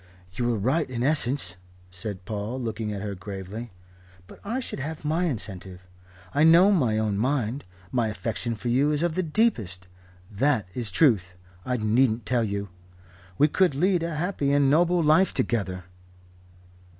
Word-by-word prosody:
"You 120 +6 -2
were 120 -2 +1
right 130 +9 0
in 120 -1 -3
essence," 130 - +2 0.3
said 95 0 -5
Paul, 110 +5 -4
looking 110 -3 -3
at 100 -1 -5
her 105 -1 -4
gravely. 100 +4 -7 0.5
"But - - -15
I 230 +6 -2
should 245 - -5
have 155 +2 -6
my 160 +4 +1
incentive. 95 - -5 0.5
I 145 - +3
know 170 +5 +7
my 125 - +2
own 105 -2 0
mind. 130 +1 -1 0.3
My 120 -3 +1
affection 115 +2 -3
for 115 +3 -6
you 135 +5 +2
is 150 +2 0
of 175 -2 0
the 185 - 0
deepest. 135 - 0 0.4
That 110 -1 +1
is 120 -4 0
Truth 95 - +2 0.3
I 125 0 0
needn't 110 +1 +1
tell 120 0 +1
you. 100 -1 -3 0.7
We 150 - +5
could 175 -1 +2
lead 180 +4 +2
a 165 -1 -3
happy 155 -3 -1
and 140 -1 +3
noble 175 +2 +3
life 155 +5 +3
together." 100 -8 -1
125 Hz, 160 wpm, -25 LUFS, 105-150 Hz, 0.7 s, know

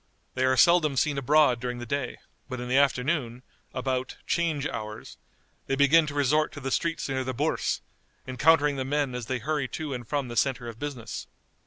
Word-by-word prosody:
They 130 0 +1
are 130 0 +3
seldom 155 -3 +5
seen 145 +1 +1
abroad 140 -2 +4
during 125 0 -3
the 120 - -6
day, 140 +3 -3 0.3
but 130 -2 -4
in 125 - -5
the 130 - +3
afternoon, 130 -2 0 0.3
about 130 0 -2
"'change 160 -5 0
hours," 105 -1 -7 0.5
they 135 - +1
begin 150 +3 +5
to 145 - -5
resort 145 +2 +2
to 145 - -7
the 135 -1 -4
streets 170 +3 -1
near 130 -1 -1
the 130 0 -4
Bourse, - - 0 0.4
encountering 145 +2 +3
the 130 - -1
men 140 -1 -1
as 125 -2 -5
they 130 - -1
hurry 145 +2 -1
to 150 +1 -5
and 120 -3 -6
from 145 -3 -1
the 120 - -7
centre 130 -1 0
of 115 -1 -8
business. 130 -6 -5
135 Hz, 195 wpm, -27 LUFS, 125-150 Hz, 0.5 s, seldom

